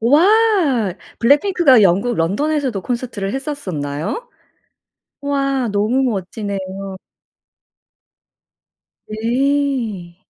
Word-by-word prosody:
우와. 305 - +3 0.2
블랙핑크가 285 - +4
영국 200 +6 +3
런던에서도 255 - 0
콘서트를 235 -5 -3
했었었나요? 195 - -4 0.9
우와. 275 -3 0
너무 215 +6 +1
멋지네요. 195 -1 -5 2.1
네. 230 -5 -1
240 Hz, 185 characters per minute, -18 LUFS, 195-285 Hz, 2.1 s, 블랙핑크가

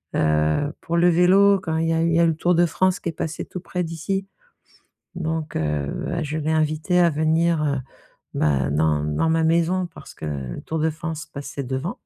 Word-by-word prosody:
Heu, 75 - +1
pour 170 - -3
le 175 +1 +5
vélo, 190 +3 +5
quand 160 -3 -2
il 165 0 0
y 165 - +2
a 160 - +1
eu 165 - +2
il 170 - +1
y - - +4
a 170 - +5
eu - - +4
le 165 - +1
Tour 175 +2 +1
de 175 - +4
France 185 +4 +1
qui - - -2
est - - -5
passé 160 +1 -4
tout 180 - -7
près 180 -1 -3
d'ici. 170 +4 -3 0.9
Donc 160 -2 -3
heu, 75 -2 -1
bah, 170 -2 -2
je 155 +2 -3
l'ai 155 +1 -1
invité 155 +3 +1
à 170 -1 +5
venir, 160 +1 +1
heu, 140 -2 0 0.6
bah, 70 -3 +1
dans 75 0 +1
dans 75 - 0
ma 160 0 +2
maison 170 +3 +2
parce 165 - -13
que - - -10
le 70 -5 -5
Tour 160 - -3
de 160 - +2
France 160 0 -6
passait 140 -2 -6
devant. 130 +8 -4
160 Hz, 225 wpm, -23 LUFS, 140-170 Hz, 0.9 s, le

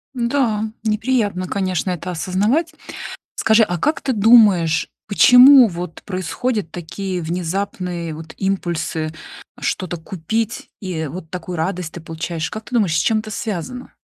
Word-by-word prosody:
Да, 235 -3 +1 0.2
неприятно, 215 -4 0
конечно, 185 -2 -1
это 180 +1 -4
осознавать. 210 - 0 0.6
Скажи, 220 +1 +4
а 175 -3 -3
как 300 - 0
ты 265 - -1
думаешь, 200 -7 +5 0.2
почему 250 +4 +8
вот 175 -1 -7
происходят 205 +2 -2
такие 180 +2 -5
внезапные 175 0 -3
вот 160 +1 -9
импульсы 170 -4 -2 0.5
что-то 180 -2 -2
купить, 195 +7 -3
и 170 -5 -3
вот 160 +2 -8
такую 180 -1 -5
радость 170 0 -2
ты 175 - -7
получаешь? 165 0 -4
Как 215 +1 -7
ты 255 - -9
думаешь, 195 -9 +2
с - - +3
чем 220 -1 +2
это 215 0 -6
связано? 225 +5 -5
185 Hz, 135 wpm, -20 LUFS, 170-220 Hz, 0.6 s, почему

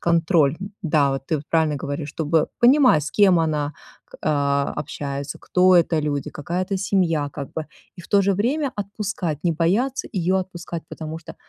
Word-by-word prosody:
контроль. 165 -3 +2 0.3
Да, 150 -5 +2
вот 135 0 -5
ты 160 - 0
вот 145 - -7
правильно 160 -2 +2
говоришь, 145 +2 -4
чтобы 155 0 0
понимать, 250 - +5
с 155 - -4
кем 195 -4 +5
она 150 -2 -1 0.3
к - - -14
а, 140 -2 +1
общается, 140 -1 -5
кто 185 0 +4
это 165 -2 +3
люди, 145 -2 -2
какая 175 +5 -3
это 195 +1 -2
семья 175 -7 +1
как 140 -3 -7
бы, 160 -1 -4 0.3
и - - -9
в 165 - -15
то 200 - +4
же 200 +1 +2
время 265 +8 0
отпускать, 195 -6 -4
не 170 - +3
бояться 200 - 0
её 185 0 +1
отпускать, 175 -2 -6
потому 160 0 -6
что 160 - -11
165 Hz, 185 wpm, -22 LUFS, 150-190 Hz, 0.3 s, понимать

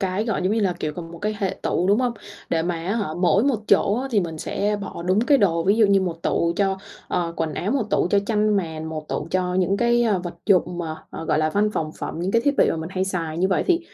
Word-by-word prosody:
cái, 190 +2 -1
gọi 220 -5 -1
giống 185 +3 +1
như 225 - +1
là, 190 -3 +2
kiểu, 155 - -2 0.2
một 170 - -9
cái 215 0 -2
hệ 195 -4 -1
tủ, 180 - 0
đúng 205 +3 +4
không? 250 -2 +1 0.4
Để 165 -1 +1
mà 175 0 -1
á 175 +6 -2
hả 210 -7 -1
mỗi 185 +5 +3
một 260 -6 +1
chỗ 200 - +4
á 270 - -4
thì 215 - +3
mình 165 -3 -4
sẽ 205 +6 -1
bỏ 190 -3 -6
đúng 185 +4 +2
cái 275 +4 +4
đồ, 170 -6 +2
ví 200 +3 +3
dụ 220 -2 +5
như 200 -1 +4
1 170 -3 -3
tủ 170 0 +1
cho, 195 -1 +1 0.3
ờ, 170 -1 -1
quần 160 -1 -2
áo, 195 - -2
1 270 0 +1
tủ - - +2
cho 200 - +4
chăn 210 -1 +2
màn, 160 -4 -3
1 155 -1 -6
tủ 150 - -3
cho 180 -1 0
những 190 +1 +2
cái, 240 +2 +3
à, 215 -5 +2
vật 175 -1 -6
dụng 180 -3 +2
mà, 160 -2 -4
ờ, 165 - -6
gọi 155 - +1
là, 155 0 +1
văn 210 +4 +2
phòng 155 -1 -2
phẩm, - - -5
những 180 +2 -1
cái 230 - +3
thiết 285 - +3
bị - - +4
mà - - -1
mình 160 0 -5
hay 185 0 0
xài. 165 -4 -3
Như 190 +2 +2
vậy 190 - +2
thì 355 -1 +3
190 Hz, 290 wpm, -23 LUFS, 170-210 Hz, 0.4 s, dụ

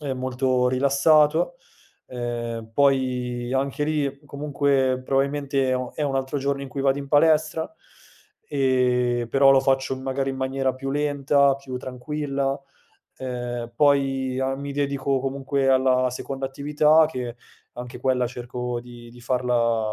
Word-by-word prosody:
e 140 -3 -3
molto 130 0 0
rilassato. 150 - +3 0.5
Ehm, 120 -2 -5
poi 125 -3 +1
anche 140 +2 -1
lì 145 -2 -1
comunque 140 -3 0
probabilmente 135 0 0
è - - +2
un 125 -1 -3
è 150 - -3
un 135 -2 0
altro 135 +2 -2
giorno 140 0 -1
in 135 - -6
cui 135 +1 -5
vado 135 0 +2
in 140 -1 -7
palestra, 155 - +2 0.8
ehm, 125 -3 +1
però 135 +2 +5
lo 135 -1 +6
faccio 135 -1 0
magari 135 +1 -2
in 135 - -5
maniera 130 0 -1
più 135 +1 -5
lenta, 140 -1 +2
più 135 -2 -7
tranquilla. 140 +2 -3 0.6
Ehm, 120 -2 -5
poi 135 -3 +2
a 135 0 0
mi 140 0 -6
dedico 140 -1 0
comunque 135 0 -1
alla 130 -1 +3
seconda 135 +2 -5
attività, 150 +3 +3
che 125 -5 -5 0.4
anche 125 0 -8
quella 125 -1 +1
cerco 125 0 -5
di 120 -1 -12
di 120 0 -15
farla 120 -3 0
135 Hz, 140 wpm, -24 LUFS, 125-140 Hz, 0.8 s, lo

